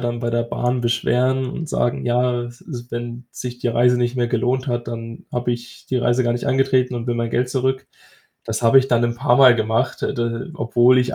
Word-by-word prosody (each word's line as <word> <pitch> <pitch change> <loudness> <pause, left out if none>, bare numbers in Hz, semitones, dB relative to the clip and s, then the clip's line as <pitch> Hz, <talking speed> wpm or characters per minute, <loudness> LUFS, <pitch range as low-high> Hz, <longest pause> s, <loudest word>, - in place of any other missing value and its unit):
dann 120 -1 -2
bei 120 -1 -1
der 120 0 +1
Bahn 125 +1 -1
beschweren 125 +3 +1
und 160 +2 -6
sagen: 120 - -1
„Ja, 120 0 +1
s 120 0 -11
s 120 -6 -8
wenn 120 +1 -6
sich 125 -1 -7
die 125 - -1
Reise 120 +1 +3
nicht 120 +1 -1
mehr 120 -1 0
gelohnt 125 +2 0
hat, 120 -1 -2
dann 115 0 -7
habe 120 0 -1
ich 120 0 -9
die 130 - -1
Reise 120 +1 +1
gar 120 - +2
nicht 120 - -3
angetreten 130 -1 +2
und 120 0 -4
will 120 - 0
mein 115 -1 -2
Geld 125 +2 0
zurück.“ 130 0 -1 0.6
Das 110 +1 -3
habe 115 +3 +6
ich 130 - +1
dann 120 -2 +3
'n 120 0 -1
paarmal 130 -1 +6
gemacht, 115 +3 -1
äh, - - -1
d 115 +4 -3
obwohl 120 -2 +3
ich 125 0 0
120 Hz, 225 wpm, -21 LUFS, 120-125 Hz, 0.6 s, habe